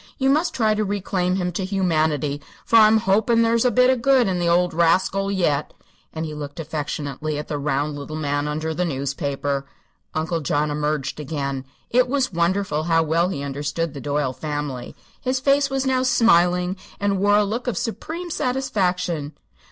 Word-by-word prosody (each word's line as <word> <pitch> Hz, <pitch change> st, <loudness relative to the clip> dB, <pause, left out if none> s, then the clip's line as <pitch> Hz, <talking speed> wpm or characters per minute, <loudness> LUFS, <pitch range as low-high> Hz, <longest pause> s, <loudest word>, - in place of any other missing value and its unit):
You 265 Hz, 0 st, +2 dB
must 315 Hz, +5 st, +1 dB
try 220 Hz, -3 st, +2 dB
to 215 Hz, 0 st, 0 dB
reclaim 190 Hz, -2 st, -1 dB
him 180 Hz, -2 st, -1 dB
to 185 Hz, +3 st, -3 dB
humanity, 155 Hz, -7 st, 0 dB, 0.2 s
for 230 Hz, -, +4 dB
I'm 220 Hz, 0 st, +7 dB
hopin' 220 Hz, +3 st, +3 dB
there's 230 Hz, +1 st, +2 dB
a -, -, +5 dB
bit 250 Hz, +1 st, +4 dB
of 255 Hz, -2 st, 0 dB
good 260 Hz, -2 st, +4 dB
in 185 Hz, -2 st, 0 dB
the 175 Hz, -, 0 dB
old 175 Hz, 0 st, +2 dB
rascal 185 Hz, +4 st, +2 dB
yet." 155 Hz, -7 st, 0 dB, 0.4 s
And 160 Hz, 0 st, -4 dB
he 155 Hz, -, -6 dB
looked 145 Hz, +1 st, -7 dB
affectionately 150 Hz, -1 st, -4 dB
at 150 Hz, -, -6 dB
the 150 Hz, -2 st, -2 dB
round 145 Hz, +1 st, -1 dB
little 150 Hz, +2 st, -7 dB
man 145 Hz, -1 st, -1 dB
under 155 Hz, +2 st, -2 dB
the 180 Hz, -, -1 dB
newspaper. 140 Hz, -2 st, -2 dB, 0.5 s
Uncle 160 Hz, +1 st, -1 dB
John 150 Hz, +1 st, 0 dB
emerged 150 Hz, -1 st, -2 dB
again. 140 Hz, -3 st, -3 dB, 0.3 s
It 250 Hz, +1 st, +4 dB
was 260 Hz, -4 st, 0 dB
wonderful 170 Hz, -2 st, 0 dB
how 165 Hz, -1 st, +3 dB
well 165 Hz, +3 st, +1 dB
he 140 Hz, -7 st, -4 dB
understood 145 Hz, +3 st, -3 dB
the 140 Hz, -, -7 dB
Doyle 145 Hz, -1 st, -1 dB
family. 145 Hz, -4 st, -5 dB, 0.3 s
His 255 Hz, 0 st, 0 dB
face 275 Hz, +1 st, +3 dB
was 270 Hz, 0 st, -1 dB
now 260 Hz, -1 st, +2 dB
smiling 180 Hz, -7 st, +3 dB, 0.2 s
and 200 Hz, -1 st, 0 dB
wore 205 Hz, +1 st, +4 dB
a 210 Hz, -, +4 dB
look 230 Hz, +5 st, -3 dB
of 245 Hz, -, -1 dB
supreme 335 Hz, +9 st, -4 dB
satisfaction. 180 Hz, -, -1 dB
175 Hz, 180 wpm, -22 LUFS, 150-215 Hz, 0.5 s, I'm